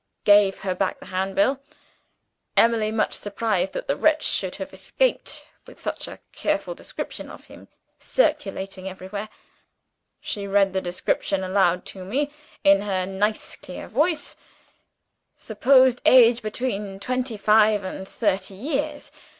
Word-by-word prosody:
Gave 205 -2 +5
her 190 -1 -1
back 185 +1 -1
the - - -12
Handbill. 195 +8 0 1.0
Emily 225 -2 +4
much 220 0 0
surprised 200 -2 -1
that - - -4
the 280 - +1
wretch 310 -1 +2
should 185 -2 0
have 190 - -7
escaped, - - -1 0.2
with - - -14
such - - -4
a - - -9
careful - - -1
description - - -7
of - - -11
him - - -15 0.3
circulated 195 - -1
everywhere. 190 +3 -6 0.9
She 200 -1 -5
read 195 -1 +3
the 190 - 0
description 185 +2 -1
aloud 185 -2 +2
to 190 - -8
me, 280 +10 -1 0.3
in 195 0 +6
her 190 -3 -1
nice 205 +3 -1
clear 180 - -9
voice: 305 +7 0 1.0
'Supposed 255 +3 +3
age 245 -2 +6
between 210 -3 -3
twenty 250 +1 -2
five 210 0 +4
and 190 0 -6
thirty 200 -3 -1
years. 280 +7 -3
205 Hz, 135 wpm, -24 LUFS, 190-245 Hz, 1.0 s, in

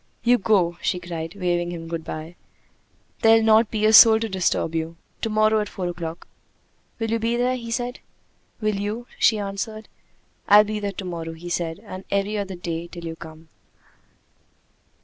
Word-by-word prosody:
"You 245 +1 +4
go," 180 -5 +2
she 180 - 0
cried, 170 0 -6
waving 175 -2 -1
him 165 -1 -7
good 165 -1 -4
by. 160 +2 -7 0.9
"There'll 225 0 +6
not 220 0 +5
be 215 -1 0
a 215 - +4
soul 220 0 +9
to 225 - -1
disturb 185 -4 0
you! 165 0 -3 0.3
To 225 - -1
morrow 215 0 +3
at 210 - -2
four 185 -2 -4
o'clock!" 170 -1 -6 0.7
"Will 225 -1 -2
you 230 - +1
be 230 +1 0
there?" 250 +1 +1
he 235 -2 -7
said. 245 +2 -3 0.6
"Will 215 -1 0
you?" 210 +4 -3
she 220 - +4
answered. 210 +2 -5 0.6
"I'll 205 +1 +8
be 215 0 -3
there 200 -1 -3
to 190 - -6
morrow," 165 -2 -5
he 170 +2 -9
said, 170 +1 -2
"and 185 -2 -8
every 200 +2 0
other 195 -2 -3
day 170 -1 -4
till 170 -1 -9
you 165 0 -5
come." 160 0 -12
195 Hz, 180 wpm, -23 LUFS, 170-220 Hz, 0.9 s, soul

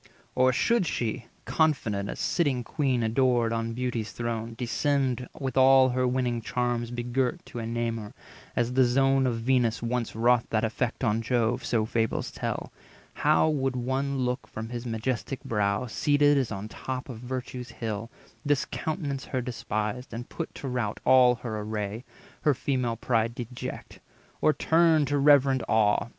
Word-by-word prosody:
Or 130 0 +4
should 210 - +2
she, 115 -3 -2 0.2
confident, 115 -11 +1
As - - -5
sitting 140 -8 +1
queen 130 -3 0
adored 120 0 +2
on 115 0 -2
Beauty's 120 -3 -2
throne, 115 -1 -3
Descend 130 +1 0
with 135 -2 -3
all 130 0 +7
her 125 0 +1
winning 125 -2 0
charms 120 0 -1
begirt 120 +1 -2
To 120 - -7
enamour, 115 -2 -3 0.4
as 120 +1 0
the 130 +1 +5
zone 135 +2 +3
of 115 -2 -1
Venus 120 -2 +1
once 120 -1 -2
Wrought 120 +1 +3
that 110 0 +1
effect 115 +3 -2
on 115 -1 +2
Jove 120 0 0
(so 110 -2 +1
fables 110 0 -1
tell), - - -4 0.4
How - - +3
would 135 -4 0
one 135 +3 -1
look 125 +1 -2
from 110 +1 -6
his 120 0 -5
majestic 120 +3 -3
brow, 105 +1 0
Seated 145 +4 +3
as 135 -5 0
on 100 0 -4
the - - -14
top 130 -1 -5
of 120 -5 -7
Virtue's 125 0 -5
hill, 115 -1 -4 0.3
Discountenance 145 0 -2
her 130 - -2
despised, 115 0 -3
and 120 +1 -6
put 165 - -6
to 140 - -6
rout 120 -5 -2
All 125 -1 +6
her 110 -1 -5
array, 105 +1 -4 0.4
her 150 -3 +3
female 125 -3 -1
pride 115 0 0
deject, 120 0 -7 0.4
Or - - +5
turn 160 -1 +3
to 145 +1 0
reverent 140 -2 +5
awe! 110 +1 +2
125 Hz, 160 wpm, -27 LUFS, 115-130 Hz, 0.4 s, all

